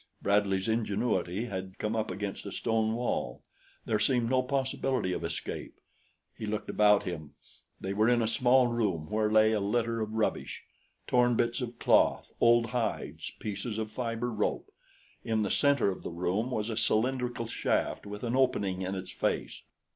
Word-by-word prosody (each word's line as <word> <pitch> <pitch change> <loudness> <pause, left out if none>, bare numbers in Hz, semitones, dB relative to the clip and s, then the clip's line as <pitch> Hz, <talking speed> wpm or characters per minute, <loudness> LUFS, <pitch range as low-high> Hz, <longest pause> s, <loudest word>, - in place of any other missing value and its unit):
Bradley's 100 -1 +1
ingenuity 110 -3 0
had 95 -4 -6
come 105 +1 -2
up 110 -1 -1
against 100 -1 -5
a - - -5
stone 110 0 0
wall. 115 - -2 0.4
There 110 - +1
seemed 120 0 +2
no 130 -1 +4
possibility 130 -5 -1
of - - -4
escape. - - -5 0.6
He 110 - -6
looked 105 0 -3
about 105 -1 +5
him. 80 -6 -6 0.4
They 95 - -3
were 110 +3 +3
in 120 -1 +3
a - - +1
small 125 +2 +4
room 105 -9 -1
where 105 0 +1
lay 110 0 +5
a 110 - +1
litter 115 +3 0
of 110 0 -3
rubbish 110 -1 -1 0.4
torn 125 -1 +3
bits 120 +2 0
of 120 -1 -5
cloth, - - +3
old 120 0 +5
hides, 115 -4 -2
pieces 105 +1 -4
of 110 -1 -3
fiber 115 +1 -2
rope. 105 -2 -2 0.5
In 110 -1 0
the 100 - -1
center 140 -8 +3
of 95 - -7
the - - -5
room 90 +7 -1
was 110 -2 -2
a 110 - -4
cylindrical 125 +1 +1
shaft 115 - -1
with 105 +2 -7
an 120 +1 -1
opening 100 -8 +1
in 95 +1 -2
its 95 -1 -6
face. - - -2
110 Hz, 170 wpm, -30 LUFS, 100-120 Hz, 0.6 s, about